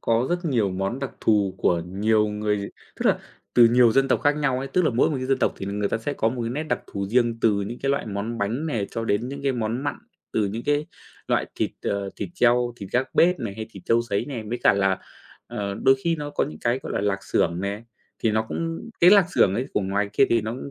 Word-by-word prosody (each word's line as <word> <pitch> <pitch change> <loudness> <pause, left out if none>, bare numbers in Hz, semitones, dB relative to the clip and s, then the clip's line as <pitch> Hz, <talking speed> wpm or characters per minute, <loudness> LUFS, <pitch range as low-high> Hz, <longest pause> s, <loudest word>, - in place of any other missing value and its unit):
có 115 +2 +1
rất 175 +1 -1
nhiều 115 - +1
món 95 +7 -2
đặc 135 -1 -4
thù 100 -3 +2
của 85 -1 +2
nhiều 105 +3 +2
người 105 -1 -2 0.3
tức - - -1
là - - +3 0.4
từ 120 - +8
nhiều 120 -1 +5
dân 135 +2 +3
tộc - - +2
khác 145 0 +2
nhau 135 -4 +1
ấy. 135 - -4
Tức 180 - +1
là - - +3
mỗi 125 +6 +2
một 145 - -1
cái 130 - -3
dân 135 0 +1
tộc - - +1
thì 95 - -6
người 100 +1 -1
ta 115 - -1
sẽ 145 +6 -3
có 110 - +1
một 120 +1 -3
cái 115 - -2
nét 145 +5 -2
đặc 155 - -2
thù 100 -1 -4
riêng 120 +2 +1
từ 115 - +4
những 110 +5 -5
cái 135 - +1
loại 140 - -1
món 110 +3 -4
bánh 115 +10 -1
này 115 -10 -1
cho 115 - -3
đến 115 +3 0
những 140 +1 -7
cái 140 -1 +1
món 120 +2 -2
mặn, 145 - -1 0.4
từ 105 -2 +1
những 110 +4 -4
cái 145 +1 +1 0.4
loại - - +1
thịt, - - -1
ờ, 100 -1 -2
thịt - - -4
treo, 120 -4 +3
thịt 100 -5 -8
gác 130 +2 0
bếp 180 +1 +4
này 110 -5 -4
hay 110 +1 -6
thịt - - -12
trâu 115 0 +3
sấy 100 -4 -1
này, 130 -6 -5
với 120 +1 -2
cả - - +6
là, 95 -1 +1 0.5
ờ, 100 -1 -4
đôi 135 0 +6
khi 165 -1 +2
nó 145 -1 -5
có - - 0
những 75 - -8
cái, 120 +2 +1
gọi - - -5
là, - - 0
lạc 100 -1 -1
xưởng 85 +2 0
nè, 100 +3 -3 0.4
thì 110 - +3
nó 110 +1 +1
cũng 165 +7 -4
cái 175 +2 +8
lạc 200 -3 +7
xưởng 95 - +4
ấy 125 +5 -1
của - - +2
ngoài 100 +1 -1
kia 135 - +5
thì 115 - +3
nó 110 +1 -4
cũng 130 +3 -7
115 Hz, 270 wpm, -24 LUFS, 100-135 Hz, 0.5 s, từ